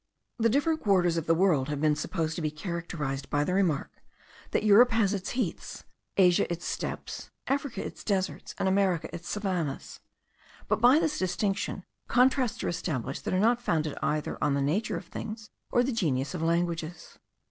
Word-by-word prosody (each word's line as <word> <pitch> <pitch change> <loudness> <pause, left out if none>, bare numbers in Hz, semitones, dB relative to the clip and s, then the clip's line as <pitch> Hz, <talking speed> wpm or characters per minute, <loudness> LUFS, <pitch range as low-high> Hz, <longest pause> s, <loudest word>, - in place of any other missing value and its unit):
The 230 0 +4
different 305 +6 +1
quarters 180 -5 +3
of 165 -2 -2
the 165 - +4
world 160 -7 +2
have 145 -1 -2
been 155 0 +3
supposed 160 +1 -2
to - - -3
be 155 - 0
characterized 150 -4 -4
by 145 0 +1
the 180 - -1
remark, 180 -7 +1 0.6
that - - 0
Europe 215 +4 +7
has 225 -4 +2
its 195 -1 -3
heaths, 215 -10 -3 0.3
Asia 180 -2 +4
its 170 0 -4
steppes, - - -4 0.2
Africa 280 -2 -2
its - - -8
deserts, 195 -3 -2
and - - 0
America 190 -4 +1
its 170 - -7
savannahs; 180 -9 -3 0.7
but - - 0
by 250 +4 +7
this 315 -2 0
distinction, 195 +1 -1 0.2
contrasts 255 -1 +2
are - - -1
established 145 -7 -3
that - - -1
are - - +2
not 235 +4 +3
founded 155 -9 0
either 150 0 -1
on 140 - +2
the 140 - 0
nature 185 +10 0
of - - -8
things, 215 +4 -7 0.2
or 245 - +3
the 265 - 0
genius 150 - 0
of 180 - -4
languages. 170 0 -2
180 Hz, 180 wpm, -28 LUFS, 155-215 Hz, 0.7 s, Europe